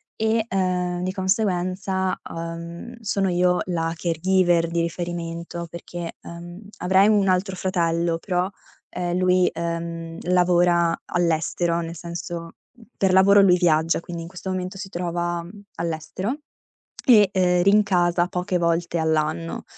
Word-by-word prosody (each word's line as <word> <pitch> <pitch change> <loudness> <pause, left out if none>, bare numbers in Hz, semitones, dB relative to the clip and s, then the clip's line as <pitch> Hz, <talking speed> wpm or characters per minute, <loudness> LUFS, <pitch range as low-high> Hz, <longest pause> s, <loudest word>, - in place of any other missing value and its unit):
e, 220 0 +1
ehm, 180 -3 -1
di 185 - -1
conseguenza, 190 -1 0
uhm, 170 +6 -7
sono 200 -2 0
io 180 0 +2
la 165 -2 -1
caregiver 175 +1 +2
di 170 0 0
riferimento 170 0 -4
perché, 170 0 -7
ehm, 175 +2 -9 0.2
avrei 190 +2 +4
un 205 -2 +3
altro 185 +1 +1
fratello 170 -2 0
però, 180 -1 0 0.4
ehm, 175 0 -2
lui, 185 0 +3
ehm, 170 0 -4
lavora 175 -1 +3
all'estero, 170 0 0
nel 165 0 -6
senso 170 0 -6 0.5
per 190 -2 +2
lavoro 200 +2 +6
lui 180 -2 +6
viaggia, 165 -2 +2
quindi 170 -1 -6
in 165 - -8
questo 190 +1 -7
momento 185 +1 -4
si 195 0 -7
trova 175 -1 -2 0.3
all'estero 170 - -3 0.7
e, 210 -7 +7
uhm, 180 -1 +3
rincasa 180 -4 +3
poche 180 0 -1
volte 170 0 0
all'anno. 160 +1 -1
175 Hz, 125 wpm, -23 LUFS, 170-185 Hz, 0.7 s, e